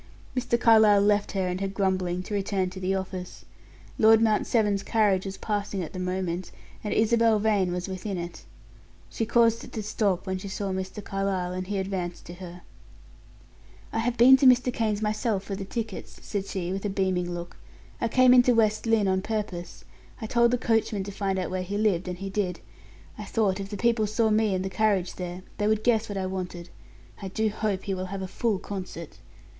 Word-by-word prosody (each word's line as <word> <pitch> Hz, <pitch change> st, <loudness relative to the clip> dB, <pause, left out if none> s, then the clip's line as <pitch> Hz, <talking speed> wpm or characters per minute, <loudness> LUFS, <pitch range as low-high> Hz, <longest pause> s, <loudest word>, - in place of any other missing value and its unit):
Mr. 240 Hz, -1 st, 0 dB
Carlyle 220 Hz, -3 st, +6 dB
left 205 Hz, 0 st, +2 dB
her 190 Hz, -2 st, 0 dB
and 180 Hz, +1 st, -3 dB
her 195 Hz, -, 0 dB
grumbling 185 Hz, -2 st, -1 dB
to 210 Hz, -, -7 dB
return 195 Hz, -2 st, -1 dB
to 185 Hz, -, -8 dB
the 190 Hz, +1 st, 0 dB
office. 190 Hz, -1 st, -6 dB, 0.5 s
Lord 220 Hz, 0 st, +7 dB
Mount 220 Hz, -2 st, +2 dB
Severn's 210 Hz, -4 st, +2 dB
carriage 205 Hz, -3 st, +2 dB
was 195 Hz, -, -6 dB
passing 205 Hz, -3 st, -2 dB
at 160 Hz, -, -8 dB
the 185 Hz, -, -5 dB
moment, 180 Hz, -1 st, -2 dB, 0.3 s
and 210 Hz, -, -3 dB
Isabel 225 Hz, 0 st, +3 dB
Vane 205 Hz, -4 st, +1 dB
was 180 Hz, +1 st, -3 dB
within 190 Hz, +1 st, -4 dB
it. 175 Hz, 0 st, -6 dB, 0.7 s
She 225 Hz, -, -2 dB
caused 230 Hz, 0 st, +3 dB
it -, -, -11 dB
to 220 Hz, -, -3 dB
stop 205 Hz, -3 st, 0 dB
when 190 Hz, -1 st, -2 dB
she 200 Hz, -, -7 dB
saw 195 Hz, 0 st, -3 dB
Mr. 190 Hz, +2 st, -4 dB
Carlyle, 195 Hz, -2 st, -2 dB
and 185 Hz, 0 st, -4 dB
he 200 Hz, 0 st, -2 dB
advanced 190 Hz, -2 st, -3 dB
to 175 Hz, -, -9 dB
her. 180 Hz, -1 st, -10 dB, 1.3 s
"I -, -, 0 dB
have 240 Hz, +1 st, -1 dB
been 255 Hz, +3 st, +8 dB
to 265 Hz, -, +5 dB
Mr. 250 Hz, 0 st, +5 dB
Kane's 215 Hz, -2 st, -1 dB
myself 215 Hz, -1 st, 0 dB
for 200 Hz, 0 st, -4 dB
the 195 Hz, 0 st, -5 dB
tickets," 220 Hz, -1 st, -5 dB
said 200 Hz, -2 st, -3 dB
she, 180 Hz, -2 st, -3 dB
with 195 Hz, -, -4 dB
a 205 Hz, -, -1 dB
beaming 185 Hz, -2 st, 0 dB
look. 175 Hz, 0 st, -6 dB, 0.4 s
"I 235 Hz, -, +2 dB
came 255 Hz, +2 st, +5 dB
into 245 Hz, -1 st, +6 dB
West 215 Hz, 0 st, +2 dB
Lynne 225 Hz, -3 st, +3 dB
on 190 Hz, 0 st, +1 dB
purpose. 200 Hz, -5 st, -4 dB, 0.3 s
I 225 Hz, -, -5 dB
told 235 Hz, +2 st, +3 dB
the 250 Hz, -, +1 dB
coachman 225 Hz, -4 st, 0 dB
to 200 Hz, -, -6 dB
find 195 Hz, -1 st, -2 dB
out 185 Hz, -, -2 dB
where 185 Hz, 0 st, -1 dB
he 195 Hz, +3 st, -3 dB
lived, 195 Hz, -5 st, +1 dB
and 180 Hz, -1 st, -4 dB
he 195 Hz, +1 st, -6 dB
did. 190 Hz, -3 st, -1 dB, 0.6 s
I -, -, -5 dB
thought 205 Hz, -4 st, 0 dB
if 195 Hz, 0 st, -5 dB
the 205 Hz, -, -5 dB
people 230 Hz, -1 st, +2 dB
saw 220 Hz, +1 st, +1 dB
me 215 Hz, -2 st, +2 dB
and 185 Hz, 0 st, -2 dB
the -, -, -2 dB
carriage 195 Hz, -2 st, +1 dB
there, 180 Hz, 0 st, -6 dB, 0.2 s
they 205 Hz, -, +1 dB
would 215 Hz, 0 st, +1 dB
guess 225 Hz, -3 st, +2 dB
what 205 Hz, -, -4 dB
I 190 Hz, -, -1 dB
wanted. 180 Hz, -2 st, -5 dB, 0.5 s
I 195 Hz, -, -4 dB
do 220 Hz, +3 st, 0 dB
hope 210 Hz, -2 st, -2 dB
he 195 Hz, -, -2 dB
will 185 Hz, 0 st, -3 dB
have 195 Hz, 0 st, -5 dB
a -, -, -4 dB
full 215 Hz, +2 st, 0 dB
concert." 185 Hz, -4 st, -7 dB
200 Hz, 210 wpm, -26 LUFS, 185-220 Hz, 1.3 s, been